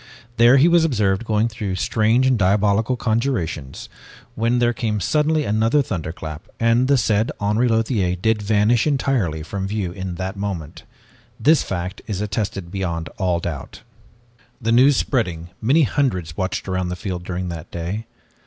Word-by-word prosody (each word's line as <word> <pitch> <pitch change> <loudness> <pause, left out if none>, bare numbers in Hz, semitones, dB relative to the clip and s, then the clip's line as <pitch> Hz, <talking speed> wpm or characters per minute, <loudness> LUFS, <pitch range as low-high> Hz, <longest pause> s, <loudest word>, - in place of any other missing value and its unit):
There 120 +3 +6
he 140 +5 +6
was 170 -1 +4
observed 105 -8 +1
going 110 0 +1
through 105 -4 -4
strange 110 +7 +2
and 130 -1 +3
diabolical 105 +4 +2
conjurations, 110 - -2 0.5
when 115 +2 +1
there 120 0 +2
came 110 -2 -2
suddenly 150 - +1
another 115 +7 +2
thunderclap 80 - -6
and 115 +2 +3
the 140 0 +4
said 110 -1 +1
Henri 105 +4 +1
Lothiere 110 -5 +1
did 110 +4 0
vanish 110 +4 +2
entirely 125 - 0
from 95 +4 -4
view 100 -3 -2
in 95 -1 -5
that 95 +3 -4
moment. 95 -6 -5 0.5
This 155 +1 +4
fact 90 +1 -4
is 100 -4 -3
attested 100 -3 -3
beyond 85 -4 -3
all 90 -3 +1
doubt. 80 -5 -6 0.8
"The 115 -2 -1
news 130 +4 +5
spreading, 90 - -1
many 140 +8 +4
hundreds 95 - -1
watched 95 +2 -3
around 95 -1 -1
the 90 - -3
field 90 -1 -5
during 90 0 -4
that 85 -2 -7
day. 90 +6 -5
105 Hz, 155 wpm, -21 LUFS, 90-120 Hz, 0.8 s, There